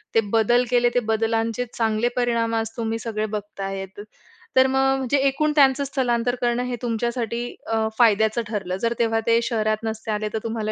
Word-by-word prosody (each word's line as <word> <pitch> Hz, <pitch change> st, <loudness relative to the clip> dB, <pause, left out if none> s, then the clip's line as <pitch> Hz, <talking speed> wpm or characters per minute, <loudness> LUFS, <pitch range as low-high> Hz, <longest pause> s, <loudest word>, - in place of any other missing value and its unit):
ते -, -, +6 dB
बदल 240 Hz, +2 st, +4 dB
केले. 245 Hz, -1 st, +3 dB
ते -, -, +5 dB
बदलांचे 225 Hz, +1 st, 0 dB
चांगले 225 Hz, 0 st, +1 dB
परिणाम 235 Hz, -2 st, 0 dB
आज 225 Hz, 0 st, -1 dB
तुम्ही 225 Hz, -1 st, -2 dB
सगळे 215 Hz, -2 st, -3 dB
बघत 210 Hz, -1 st, -6 dB
आहेत. 195 Hz, 0 st, -5 dB, 0.6 s
तर 260 Hz, 0 st, +6 dB
मग 265 Hz, 0 st, +2 dB
म्हणजे 265 Hz, +1 st, 0 dB
एकूण 300 Hz, +3 st, +1 dB
त्यांचं 275 Hz, -1 st, +4 dB
स्थलांतर 245 Hz, -3 st, 0 dB
करणं 240 Hz, 0 st, +1 dB
हे 250 Hz, -1 st, -3 dB
तुमच्यासाठी 235 Hz, 0 st, -2 dB, 0.3 s
अ, 220 Hz, -1 st, +1 dB
फायद्याचं 220 Hz, 0 st, +3 dB
ठरलं. 195 Hz, -4 st, -3 dB
जर 230 Hz, 0 st, +1 dB
तेव्हा 225 Hz, -1 st, +2 dB
ते 230 Hz, 0 st, +5 dB
शहरात 215 Hz, -2 st, 0 dB
नसते 220 Hz, 0 st, -4 dB
आले, 210 Hz, 0 st, -2 dB
तर 220 Hz, -, -1 dB
तुम्हाला 220 Hz, -1 st, -2 dB
230 Hz, 180 wpm, -23 LUFS, 220-245 Hz, 0.6 s, ते